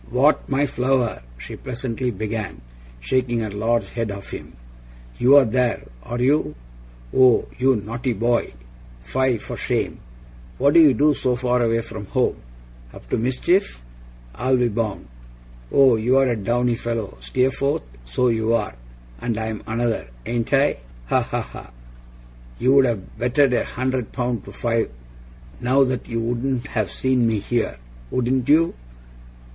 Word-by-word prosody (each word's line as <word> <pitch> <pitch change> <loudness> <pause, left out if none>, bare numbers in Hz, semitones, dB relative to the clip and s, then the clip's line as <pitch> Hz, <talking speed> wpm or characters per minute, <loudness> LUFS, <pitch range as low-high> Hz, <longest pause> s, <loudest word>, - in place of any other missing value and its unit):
'What! 130 +6 +2
My 140 +1 +2
flower!' 125 - 0 0.2
she - - -8
pleasantly 125 -1 -3
began, 110 - -4 0.4
shaking 120 - 0
her 110 -2 -3
large 115 +3 0
head 115 -2 -3
at 100 -1 -6
him. - - -8 0.7
'You're 135 +2 +7
there, 125 +1 0 0.2
are 120 - -5
you! 130 - +2 0.6
Oh, 130 -3 +5
you 130 +1 +4
naughty 115 +5 -3
boy, 120 +3 0 0.5
fie 125 - +1
for - - -7
shame, - - -2 0.6
what 140 +2 +3
do - - +7
you 145 -5 +6
do 150 +5 +4
so 130 -2 0
far 125 0 +1
away 115 0 +2
from 110 -3 -8
home? - - 0 0.5
Up - - -13
to - - +2
mischief, 130 - 0 0.5
I'll 130 - +1
be 125 -1 +2
bound. 105 - -3 0.6
Oh, 135 -3 +6
you're 130 +4 +3
a 120 - +1
downy 120 +3 0
fellow, 115 - -4
Steerforth, 130 - 0 0.2
so - - 0
you 115 0 +1
are, 105 - -2 0.5
and 115 -3 -2
I'm 110 -1 -3
another, 115 - -1 0.2
ain't 120 -1 -2
I? 140 +1 +3 0.3
Ha, - - +3
ha, - - -2
ha! - - -10 0.9
You'd 135 +2 +5
have 110 -7 -3
betted 125 +2 +3
a - - +2
hundred 130 -2 -2
pound 120 -5 -2
to - - -9
five, 115 -1 -1 0.7
now, 130 +3 +4
that 130 -1 -3
you 115 -1 -1
wouldn't 120 +2 -1
have 110 -3 -1
seen 130 -3 +1
me 110 -1 +1
here, 115 - -1 0.3
wouldn't 125 0 0
you? 165 +3 +4
120 Hz, 150 wpm, -22 LUFS, 115-130 Hz, 0.9 s, You're